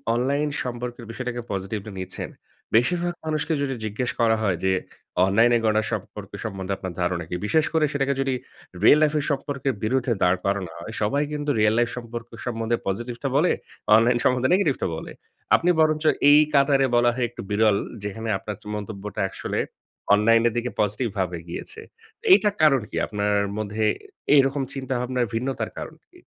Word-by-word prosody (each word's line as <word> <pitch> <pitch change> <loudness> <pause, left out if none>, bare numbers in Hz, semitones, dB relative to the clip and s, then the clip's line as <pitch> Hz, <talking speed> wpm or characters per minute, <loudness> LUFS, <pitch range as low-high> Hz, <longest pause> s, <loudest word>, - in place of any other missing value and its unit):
Online 140 +4 +1
সম্পর্কের 120 -1 -5
বিষয়টাকে 125 0 -4
positively 100 +2 -4
নিচ্ছেন। 95 0 -5 0.5
বেশিরভাগ 175 +9 +2
মানুষকে 155 +1 -1
যদি 135 -2 -1
জিজ্ঞেস 110 +4 -2
করা 115 -1 +4
হয় 95 -4 +1
যে 95 - +3 0.5
অনলাইনে 115 +5 +4
গড়া 110 0 +3
সম্পর্ক 105 -1 -5
সম্বন্ধে 95 -3 -3
আপনার 95 -2 -6
ধারণা 90 -1 -1
কী? - - -3
বিশেষ 160 +6 +3
করে 160 -1 +3
সেটাকে 140 -1 +1
যদি 135 -1 0 0.5
real 150 - +7
লাইফের 150 -1 +2
সম্পর্কের 140 -1 -2
বিরুদ্ধে 125 +1 +1
দাঁড় 90 0 +3
করানো 100 -4 -1
হয়, 110 +6 -8
সবাই 125 +8 +1
কিন্তু 145 0 -3
real 105 0 +4
লাইফ 120 0 +2
সম্পর্ক 120 0 -6 0.2
সম্বন্ধে 115 -1 -1
পজিটিভটা 120 +6 -3
বলে, 170 +4 +3 0.4
অনলাইন 120 +2 +4
সম্বন্ধে 125 0 +3
নেগেটিভটা 165 - +1
বলে। - - -8 0.4
আপনি 175 - +2
বরঞ্চ 155 0 +2 0.3
এই 150 - +8
কাতারে 140 -1 +4
বলা 120 0 +4
হয় 125 -2 0
একটু 120 - -9
বিরল 105 -1 +3 0.3
যেখানে 110 +2 -4
আপনার 105 0 -6
চ - - -19
মন্তব্যটা 105 -1 -5
আসলে - - -4 0.5
অনলাইনের 115 +2 +4
দিকে 120 +1 -1
পজিটিভভাবে 100 -4 -1
গিয়েছে। 435 - -7 0.5
এইটা 210 - +5
কারণ 135 -5 +5
কি? - - -8
আপনার 105 0 -1 0.2
মধ্যে 110 +1 -1 0.5
এই 140 - +8
রকম 135 0 -2
চিন্তাভাবনার 130 -2 -1
ভিন্নতার 130 +4 -2
কারণ - - -7
কি? 360 - -28
120 Hz, 160 wpm, -24 LUFS, 105-135 Hz, 0.5 s, এই